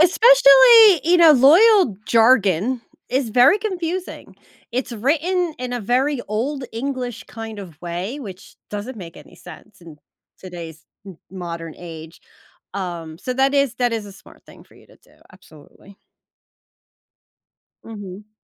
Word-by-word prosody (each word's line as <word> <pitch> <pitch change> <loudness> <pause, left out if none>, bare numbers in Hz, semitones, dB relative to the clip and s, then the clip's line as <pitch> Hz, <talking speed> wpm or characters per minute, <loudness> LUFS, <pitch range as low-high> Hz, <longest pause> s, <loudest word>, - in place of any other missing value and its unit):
Especially, 475 +1 +6
you 350 +2 +3
know, 330 -3 +6
loyal 320 - +4
jargon 225 -1 +2 0.3
is 255 -2 -2
very 255 - +4
confusing, 370 -4 -6 0.4
it's 250 0 -4
written 320 - -1
in 250 0 -6
a 245 - -4
very 255 +5 -1
old 255 +6 -3
English 245 -2 -5
kind 225 -1 -9
of 175 -7 -12
way, 180 +11 -6
which 195 -6 -12 0.2
doesn't 210 +3 -7
make 170 -3 -11
any - - -16
sense 180 +4 -15
in 165 -3 -14 0.4
today's 165 -4 -11 0.2
m 185 -4 -11
modern 170 -3 -8
age, 165 -1 -12 0.5
um, 170 -4 -6
so, 255 - -5
that 270 +2 +1
is 275 -4 +1
that 245 -2 -1
is 220 -2 -5
a 200 - -12
smart 195 - -19
thing - - -17
for - - -25
you - - -21
to - - -22
do, - - -26 0.2
absolutely. 185 +2 -19 1.9
Mhm. 205 -2 -11
235 Hz, 140 wpm, -20 LUFS, 185-290 Hz, 1.9 s, Especially